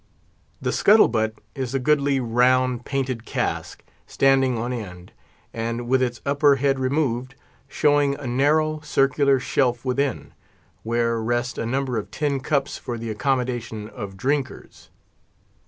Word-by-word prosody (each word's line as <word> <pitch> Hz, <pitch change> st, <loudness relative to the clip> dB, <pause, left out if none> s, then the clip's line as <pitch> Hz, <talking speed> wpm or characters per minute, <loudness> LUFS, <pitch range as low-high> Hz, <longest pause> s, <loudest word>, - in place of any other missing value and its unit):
The -, -, -1 dB
scuttle 215 Hz, +2 st, +5 dB
butt 110 Hz, -1 st, -1 dB, 0.2 s
is 130 Hz, -1 st, -4 dB
a -, -, +2 dB
goodly, 140 Hz, 0 st, +2 dB
round, 125 Hz, +1 st, +2 dB
painted 130 Hz, -4 st, -2 dB
cask, -, -, -3 dB, 0.2 s
standing 135 Hz, -2 st, +2 dB
on 120 Hz, +3 st, -2 dB
end, 90 Hz, -6 st, -8 dB, 0.4 s
and 115 Hz, +1 st, -3 dB
with 130 Hz, +1 st, +2 dB
its 120 Hz, -1 st, -1 dB
upper 140 Hz, 0 st, +4 dB
head 135 Hz, 0 st, +1 dB
removed, 130 Hz, -1 st, -1 dB, 0.3 s
showing 145 Hz, 0 st, +2 dB
a 140 Hz, -, -9 dB
narrow, 155 Hz, +5 st, +1 dB
circular 140 Hz, -2 st, +2 dB
shelf 125 Hz, -1 st, 0 dB
within, 130 Hz, +1 st, -1 dB, 0.5 s
where 115 Hz, 0 st, 0 dB
rest 120 Hz, +2 st, -1 dB
a 115 Hz, -, -2 dB
number 130 Hz, -1 st, -1 dB
of 105 Hz, -, -8 dB
tin 145 Hz, -2 st, -1 dB
cups 140 Hz, 0 st, -1 dB
for 120 Hz, -, -5 dB
the 115 Hz, -1 st, -5 dB
accommodation 120 Hz, -3 st, -2 dB
of 100 Hz, -5 st, -8 dB
drinkers. 135 Hz, +4 st, -3 dB
130 Hz, 140 wpm, -23 LUFS, 120-140 Hz, 0.5 s, scuttle